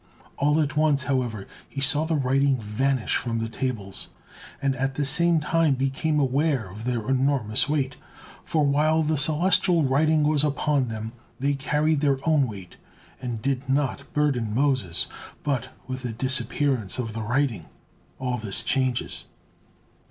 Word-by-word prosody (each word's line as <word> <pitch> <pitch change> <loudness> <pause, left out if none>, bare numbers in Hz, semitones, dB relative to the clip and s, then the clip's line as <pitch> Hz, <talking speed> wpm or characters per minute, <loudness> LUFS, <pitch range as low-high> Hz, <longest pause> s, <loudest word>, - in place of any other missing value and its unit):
All 150 +2 +2
at 150 -1 0
once, 150 -3 +2
however, 125 -7 -2 0.2
he 140 - -6
saw 145 +3 +5
the 160 0 0
writing 135 0 +2
vanish 120 +3 -1
from 115 -2 -2
the 115 0 -2
tables, 115 -5 -3 0.5
and 135 -1 0
at 135 +1 -1
the 145 - 0
same 170 +4 +3
time 155 -1 +2
became 135 +4 0
aware 135 -3 +1
of 105 +4 -9
their 120 -3 -2
enormous 130 -3 +1
weight; 140 -3 -1 0.5
for 155 -2 +1
while 155 +3 +2
the 155 +1 +1
celestial 170 +3 +4
writing 150 +3 +3
was 150 -1 +2
upon 145 -2 +1
them, 110 0 -5 0.3
they 140 +2 +1
carried 150 +2 0
their 140 -2 +2
own 150 -5 +3
weight 100 -5 -9 0.4
and 120 -4 -4
did 135 0 -2
not 140 0 -1
burden 125 -8 0
Moses, 130 -11 +1 0.4
but 130 -4 -1 0.2
with 130 0 -5
the 120 -2 -4
disappearance 130 -2 0
of 115 -4 -3
the 110 - -4
writing 115 - -1 0.5
all 125 -1 -2
this 105 -3 0
changes. 130 -2 -1
135 Hz, 150 wpm, -25 LUFS, 125-150 Hz, 0.5 s, saw